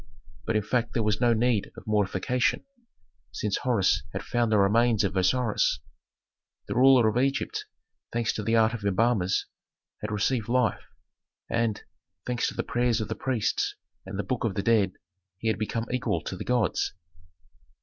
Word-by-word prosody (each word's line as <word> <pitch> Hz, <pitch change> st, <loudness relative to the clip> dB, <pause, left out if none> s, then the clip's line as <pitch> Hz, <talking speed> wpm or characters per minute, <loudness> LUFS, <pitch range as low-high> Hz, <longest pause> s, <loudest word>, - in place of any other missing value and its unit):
But 110 Hz, -, 0 dB
in 105 Hz, -, +2 dB
fact 120 Hz, +1 st, -1 dB
there 115 Hz, -, +1 dB
was 105 Hz, +1 st, 0 dB
no 120 Hz, -1 st, +4 dB
need 115 Hz, -2 st, +1 dB
of -, -, -10 dB
mortification, 105 Hz, +3 st, 0 dB, 0.7 s
since 105 Hz, -2 st, -1 dB
Horus 115 Hz, -7 st, +2 dB
had -, -, -4 dB
found 120 Hz, -2 st, 0 dB
the 110 Hz, -, +4 dB
remains 110 Hz, +3 st, +3 dB
of 95 Hz, -1 st, -1 dB
Osiris. 105 Hz, -, +2 dB, 0.9 s
The -, -, -2 dB
ruler 130 Hz, -2 st, +6 dB
of 110 Hz, +3 st, +1 dB
Egypt, 135 Hz, +1 st, -1 dB, 0.5 s
thanks 115 Hz, -1 st, 0 dB
to -, -, -3 dB
the 115 Hz, +2 st, +1 dB
art 110 Hz, 0 st, +4 dB
of 115 Hz, -3 st, -5 dB
embalmers, 100 Hz, -1 st, +1 dB, 0.6 s
had 105 Hz, -, -3 dB
received 110 Hz, +2 st, 0 dB
life, 125 Hz, -4 st, +1 dB, 0.7 s
and, 115 Hz, -2 st, 0 dB, 0.4 s
thanks 125 Hz, -1 st, 0 dB
to -, -, -5 dB
the -, -, -1 dB
prayers 120 Hz, -1 st, +1 dB
of 110 Hz, -, -4 dB
the 110 Hz, -, -2 dB
priests 115 Hz, -5 st, -1 dB, 0.3 s
and -, -, -7 dB
the 100 Hz, -, -1 dB
Book 130 Hz, -3 st, -2 dB
of 110 Hz, -5 st, -1 dB
the 100 Hz, -, -1 dB
Dead, 105 Hz, -5 st, +3 dB, 0.4 s
he 115 Hz, -, -1 dB
had 110 Hz, -, -1 dB
become 115 Hz, +1 st, -2 dB
equal 125 Hz, -10 st, -1 dB
to 95 Hz, -, -5 dB
the -, -, -7 dB
gods. 120 Hz, -7 st, 0 dB
110 Hz, 170 wpm, -27 LUFS, 105-120 Hz, 0.9 s, ruler